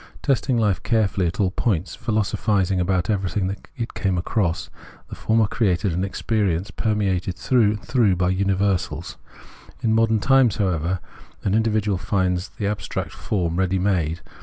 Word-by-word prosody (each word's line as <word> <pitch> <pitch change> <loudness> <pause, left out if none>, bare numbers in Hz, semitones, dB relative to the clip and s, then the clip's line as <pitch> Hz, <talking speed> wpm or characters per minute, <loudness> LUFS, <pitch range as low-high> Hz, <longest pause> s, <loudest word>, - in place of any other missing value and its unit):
Testing 135 -2 +1
hfe 105 -6 +1
carefully 105 -5 +1
at 85 - -4
all 95 -3 +2
points, 95 -5 -1
philosophising 100 -3 0
about 90 -1 +1
everything 95 -1 -1 0.2
it 115 -1 -4
came 95 -2 0
across, 90 -1 -1 0.4
the - - -9
former 110 0 +2
created 100 -4 0
an 90 +3 -1
experience 100 -1 -1
permeated 100 -5 0
through 115 -3 +2
and 105 - -8
through 110 -8 +3
by 90 0 +1
universals. 95 0 0 0.7
In 110 -2 +2
modern 115 -1 +3
times, 130 -2 +4
however, 90 -2 0 0.4
an 95 - 0
individual 105 -3 +1
finds 95 -1 0
the 105 - -5
abstract 105 0 -3
form 85 -4 -2
ready 95 0 +1
made. 90 -4 0
100 Hz, 145 wpm, -23 LUFS, 90-110 Hz, 0.7 s, times